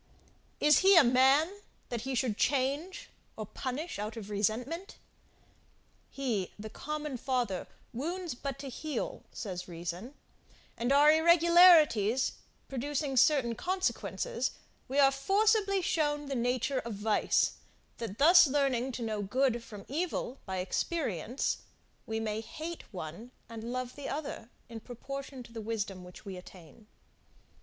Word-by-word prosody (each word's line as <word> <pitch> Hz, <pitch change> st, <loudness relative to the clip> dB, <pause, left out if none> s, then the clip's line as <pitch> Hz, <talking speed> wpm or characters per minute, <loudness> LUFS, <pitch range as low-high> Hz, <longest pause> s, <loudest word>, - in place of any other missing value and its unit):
Is 300 Hz, 0 st, +6 dB
he 390 Hz, +1 st, +6 dB
a 330 Hz, -, +9 dB
man, 270 Hz, +9 st, +4 dB, 0.3 s
that 240 Hz, -2 st, -3 dB
he 260 Hz, +2 st, -3 dB
should 240 Hz, -3 st, 0 dB
change, 280 Hz, -, -1 dB, 0.3 s
or 215 Hz, -, -4 dB
punish 260 Hz, -, -5 dB
out 215 Hz, +3 st, -4 dB
of 210 Hz, -2 st, -7 dB
resentment? 235 Hz, -, -2 dB, 1.1 s
He 230 Hz, -9 st, -2 dB
the 215 Hz, +1 st, -8 dB
common 300 Hz, -2 st, -4 dB
father, 245 Hz, -7 st, -1 dB, 0.3 s
wounds 340 Hz, +7 st, -3 dB
but 275 Hz, +2 st, -5 dB
to 275 Hz, -, -7 dB
heal, 310 Hz, -, -4 dB
says 180 Hz, -4 st, -6 dB
reason, 175 Hz, -, -6 dB, 0.6 s
and 240 Hz, +3 st, -1 dB
our 290 Hz, +2 st, +7 dB
irregularities 320 Hz, -, +6 dB, 0.4 s
producing 280 Hz, +1 st, -2 dB
certain 260 Hz, -2 st, +4 dB
consequences, 375 Hz, -, -1 dB, 0.4 s
we 270 Hz, +2 st, -3 dB
are 275 Hz, -1 st, +6 dB
forcibly 395 Hz, +6 st, +2 dB
shown 295 Hz, -3 st, 0 dB
the 280 Hz, -, -4 dB
nature 255 Hz, +2 st, 0 dB
of 230 Hz, -3 st, -5 dB
vice; 210 Hz, +1 st, +1 dB, 0.4 s
that 225 Hz, -3 st, -5 dB
thus 335 Hz, +3 st, +8 dB
learning 265 Hz, -2 st, +1 dB
to 240 Hz, -, -4 dB
know 215 Hz, -2 st, -2 dB
good 240 Hz, +3 st, +1 dB
from 205 Hz, -4 st, -10 dB
evil, 295 Hz, -3 st, -3 dB
by 190 Hz, 0 st, -3 dB
experience, 230 Hz, -, -1 dB, 0.5 s
we 220 Hz, 0 st, -2 dB
may 220 Hz, 0 st, -2 dB
hate 320 Hz, +8 st, -8 dB
one 180 Hz, +5 st, -7 dB, 0.2 s
and 230 Hz, 0 st, -7 dB
love 255 Hz, 0 st, -4 dB
the 285 Hz, -, -6 dB
other, 280 Hz, -5 st, -5 dB, 0.2 s
in 230 Hz, -1 st, -8 dB
proportion 265 Hz, +3 st, -7 dB
to 230 Hz, 0 st, -15 dB
the 225 Hz, -, -5 dB
wisdom 205 Hz, -4 st, -3 dB
which 180 Hz, +3 st, -13 dB
we 190 Hz, -2 st, -6 dB
attain. 180 Hz, +2 st, -14 dB
255 Hz, 135 wpm, -31 LUFS, 220-300 Hz, 1.1 s, a